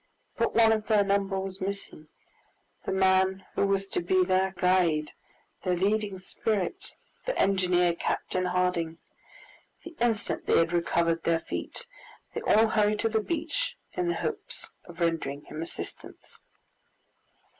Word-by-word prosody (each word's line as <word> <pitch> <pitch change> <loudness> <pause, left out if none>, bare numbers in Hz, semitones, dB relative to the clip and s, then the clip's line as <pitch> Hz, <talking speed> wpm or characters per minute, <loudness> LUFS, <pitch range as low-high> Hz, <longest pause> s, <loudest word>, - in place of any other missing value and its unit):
But 230 - 0
one 225 -1 +6
of 215 -1 0
their 210 -2 +4
number 195 -1 +1
was 190 0 -6
missing, 195 -5 -4 0.8
the - - -2
man 190 0 +3
who 200 - +2
was 195 0 +1
to - - -1
be 185 +1 +3
their 190 +1 +1
guide, 175 -5 +2 0.5
their 180 -2 0
leading 200 +1 0
spirit, 215 - -2 0.3
the - - -1
engineer, 180 -2 +3
Captain 185 +2 -2
Harding! 180 -2 0 0.9
The 340 -1 -10
instant 235 -2 0
they - - +4
had 165 +1 +2
recovered 170 -1 +1
their 165 0 +1
feet, - - -6 0.5
they - - -3
all 220 +1 +4
hurried 210 -1 +2
to 225 - +2
the 220 0 +1
beach 325 +4 -2 0.2
in 360 - -1
the 345 - +1
hopes - - -4
of 175 -1 -12
rendering 160 -4 -1
him 155 - -7
assistance. 165 - -8
190 Hz, 145 wpm, -28 LUFS, 175-215 Hz, 0.9 s, one